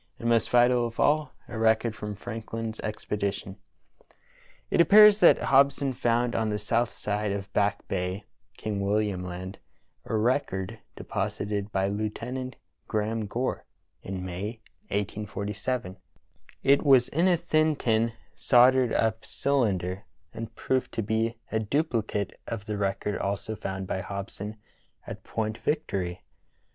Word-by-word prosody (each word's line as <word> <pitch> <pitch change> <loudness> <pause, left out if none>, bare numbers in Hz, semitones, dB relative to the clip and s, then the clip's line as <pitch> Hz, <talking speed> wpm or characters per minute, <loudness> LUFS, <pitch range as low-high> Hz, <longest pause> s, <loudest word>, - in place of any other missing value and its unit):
and, 115 - -4
most 115 -1 +3
vital 120 0 +4
of 115 - -10
all, 150 +1 +3 0.2
a 110 - -6
record 110 0 +2
from 105 -1 -5
Frankhn's 115 0 -5
expedition. 100 -2 -3 1.1
It - - +5
appears 210 +3 +8
that - - +7
Hobson 140 0 +3
found 120 0 +1
on 110 -1 0
the 105 - 0
south 115 +3 0
side 105 0 -2
of 100 0 -5
Back 100 0 +1
Bay, 90 +1 -2 0.3
King 105 -2 -3
William 100 -1 0
Land, 90 +2 -6 0.5
a - - -2
record 110 -3 0 0.2
deposited 105 0 -3
by 95 -1 +1
Lieutenant 115 +5 -3 0.3
Graham 110 0 -1
Gore 125 +5 -2 0.4
in 95 -1 -5
May, 100 +6 -5 0.3
1847. 105 +1 -3 0.7
It 140 +1 +5
was 135 -4 +5
in 170 +5 +2
a 180 -2 +4
thin 155 -2 +2
tin 115 -3 +1 0.2
soldered 125 -1 +5
up 110 0 +1
cylinder, 100 -9 0 0.3
and 115 0 -7
proved 130 -1 -1
to 115 - -1
be 110 +2 0
a 110 - +1
dupli 115 -1 0
cate 100 -2 -2
of 110 -3 -5
the 105 -2 -3
record 100 +1 -1
also 100 +2 -2
found 95 -2 -4
by 95 - -2
Hobson 100 +2 -6 0.5
at - - -8
Point 110 0 -3
Vic 150 +1 0
tory. 90 -2 -3
110 Hz, 140 wpm, -27 LUFS, 100-120 Hz, 1.1 s, appears